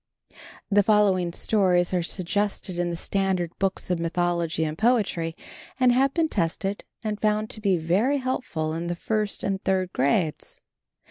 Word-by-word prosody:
The 205 +1 +6
following 200 -4 +3
stories 180 -2 +2
are 180 - +2
suggested 185 +1 -2
in 175 0 0
the 170 - -2
standard 185 -1 -1
books 190 -1 -1
of 175 - 0
mythology 170 -1 0
and 155 -1 -2
poetry, 200 -7 +1 0.4
and 255 -1 +5
have 265 +2 +3
been 325 +2 +1
tested 195 - -2 0.2
and 215 -1 -3
found 215 0 +1
to 215 - -6
be 195 -3 +2
very 195 - +1
helpful 255 - -2
in 165 +1 -3
the 175 - -2
first 210 +3 -2
and 195 -1 -2
third 185 -1 0
grades. 150 +4 0
190 Hz, 155 wpm, -25 LUFS, 170-210 Hz, 0.4 s, The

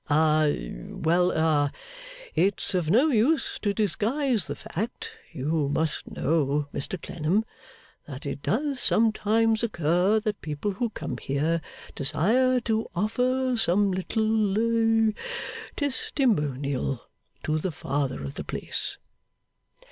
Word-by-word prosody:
A 155 - +2 0.2
well 175 +3 +2
a 155 -4 +2 0.6
it's 195 +5 +1
of 175 -4 0
no 250 - +5
use 270 +4 +2
to 205 - +1
disguise 225 - 0
the - - -3
fact 215 +7 -5 0.2
you 145 +1 -1
must 155 +1 -1
know, 145 -1 0
Mr 180 +6 -4
Clennam, 170 +8 0 0.6
that 140 -1 -8
it 140 0 -4
does 275 - 0
sometimes 225 0 +2
occur 180 0 +2
that 210 -2 -2
people 155 +6 -2
who 230 +5 -1
come 135 - -5
here 155 +5 0 0.3
desire 240 - +2
to 225 -1 0
offer 250 +6 +1
some 200 -2 +3
little 220 +3 +2 0.6
Testimonial 145 - 0 0.4
to 155 0 0
the 180 +3 -2
Father 140 - -2
of 70 - -5
the - - -5
place. - - -4
190 Hz, 115 wpm, -26 LUFS, 150-225 Hz, 0.6 s, no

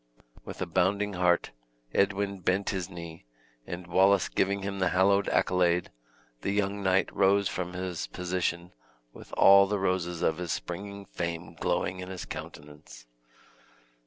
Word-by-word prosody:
With - - -5
a - - -2
bounding 100 +2 +1
heart 90 -1 +2 0.4
Edwin 100 0 +1
bent 95 +4 0
his 95 -2 -3
knee, 85 -6 -9 0.4
and 90 +1 -6
Wallace 95 +2 +3
giving 100 0 0
him 100 0 -4
the 95 -1 +2
hallowed 100 +2 +3
accolade, 90 -1 +2 0.5
the - - -2
young 100 0 0
knight 95 0 +1
rose 100 0 +3
from 90 -1 -4
his 90 -2 -4
position 90 -1 -3 0.4
with - - -13
all 100 0 +7
the 105 +1 0
roses 90 -3 -1
of 80 +1 +1
his 90 -3 -3
springing 100 +3 -5
fame 85 -1 -5
glowing 90 +2 -1
in 90 0 -7
his 95 -1 -6
countenance. 75 -5 -10
95 Hz, 145 wpm, -28 LUFS, 85-100 Hz, 0.5 s, all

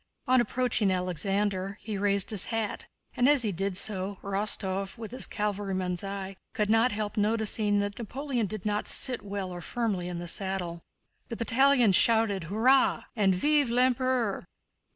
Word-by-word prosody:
On 255 -2 +4
approaching 240 -3 0
Alexander 190 +2 -1
he 215 -1 -5
raised 200 0 +1
his 210 -4 -1
hat, 225 -3 -3 0.3
and 250 +2 +4
as 290 -4 +4
he 215 - 0
did 195 +1 -3
so, 195 -1 -1
Rostóv, 195 0 -1
with 225 -1 -7
his 255 - -2
cavalryman's 195 -3 -2
eye, 195 -1 -5 0.2
could 210 0 +1
not 225 +3 +4
help 210 +1 -4
noticing 210 -1 +1
that 205 +2 -4
Napoleon 245 0 -2
did 215 -1 -6
not 210 0 -1
sit 255 -3 +1
well 200 -2 -5
or 175 0 -7
firmly 200 -3 -2
in 180 -1 -4
the 175 0 -6
saddle. 180 -2 -3 0.5
The 230 - -4
battalions 245 -2 +4
shouted 220 -6 +2
"Hurrah!" 245 +9 +3
and 195 -4 +3
"Vive 290 +6 +2
l'Empereur!" 250 -2 +1
205 Hz, 155 wpm, -28 LUFS, 195-230 Hz, 0.5 s, On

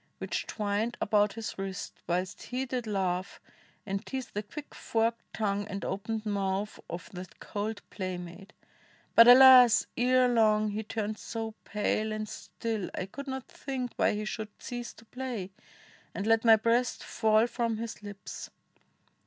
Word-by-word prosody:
Which - - -3
twined 210 +2 -1
about 210 -1 +2
his 225 -3 -6
wrist, 195 -1 -4
whilst 180 +1 -1
he 255 +1 -3
did 250 -2 -3
laugh 190 -3 -1 0.5
And 195 -1 -3
tease 265 -2 -4
the 210 - -3
quick 290 +8 -9
forked 230 +1 0
tongue 205 -1 -1
and 200 -1 -5
opened 215 +3 -3
mouth 200 0 -1
Of 170 - -7
that 180 0 -9
cold 210 0 -4
playmate. 185 +1 -6 0.6
But, 230 - +9
alas! 250 -2 +9
ere 255 +1 +4
long 215 -3 +3
He 210 +2 -2
turned 215 -1 -3
so 225 -1 -5
pale 215 +1 0
and 215 0 -3
still, 220 -1 -4
I - - -2
could 280 +9 -8
not 265 -1 -5
think 255 -3 -4
Why - - +2
he 210 0 -3
should 215 0 -4
cease 240 -2 -6
to 225 - -17
play, 240 -5 -5 0.6
and 200 - -3
let 225 0 +4
my 225 -1 +8
breast 230 +3 +1
Fall 220 0 +3
from 235 -2 -1
his 230 -1 -6
lips. 205 -1 -8
215 Hz, 155 wpm, -30 LUFS, 200-235 Hz, 0.6 s, But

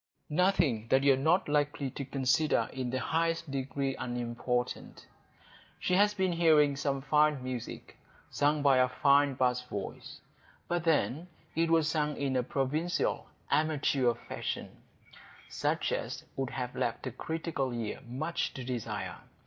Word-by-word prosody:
Nothing 160 - +2
that 135 +3 +3
you 140 -1 +6
are 135 +3 -1
not 180 - +2
likely 145 -2 0
to 140 - -5
consider 135 +3 +1
in 130 -2 -3
the 130 - -1
highest 165 +1 -1
degree 135 0 -2
unimportant. 120 0 -3 0.7
She 180 - -1
had 205 +2 +4
been 190 -1 +2
hearing 155 -4 +4
some 140 -1 -2
fine 150 -1 +3
music 130 -2 -6 0.3
sung 145 0 +1
by 140 -2 +5
a 130 0 +4
fine 140 +1 +3
bass 125 -1 +1
voice,—but 125 - -7
then 160 0 +1 0.3
it 165 +1 +2
was 165 -2 +4
sung 150 -2 0
in 135 -2 -1
a 125 - +3
provincial, 145 +7 -1 0.2
amateur 145 -5 +2
fashion, - - -5 0.7
such - - -1
as - - -3
would 135 -1 -2
have 125 -2 -4
left 115 - -2
a 130 - -3
critical 160 0 -3
ear 115 -3 -4
much 155 +8 -2
to 130 - -5
desire. 125 -3 -4
140 Hz, 140 wpm, -31 LUFS, 130-160 Hz, 0.7 s, you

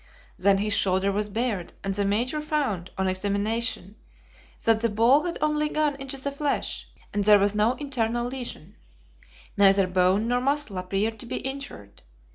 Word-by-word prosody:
Then 200 -1 +3
his 210 +1 0
shoulder 190 0 +2
was 210 +1 -1
bared, 215 -4 -2
and 195 0 -1
the 200 +1 -1
Major 240 +9 0
found, 270 - -2
on 190 0 0
examination, 205 +2 -1 0.7
that 225 -1 +3
the 230 - +1
ball 235 +9 +4
had 345 - -3
only 300 0 +1
gone 305 -2 0
into 275 0 -5
the 280 +1 -3
flesh, 285 +1 -2 0.3
and 205 - 0
there 210 0 +7
was 200 0 +2
no 210 +3 +2
internal 240 -4 -1
lesion. 245 -8 -6 0.8
Neither 195 -1 +5
bone 185 +4 +2
nor 245 +1 +1
muscle 275 -7 -1
appeared 200 +4 -2
to 240 - -6
be - - -3
injured. 265 - -7
220 Hz, 165 wpm, -26 LUFS, 195-265 Hz, 0.8 s, there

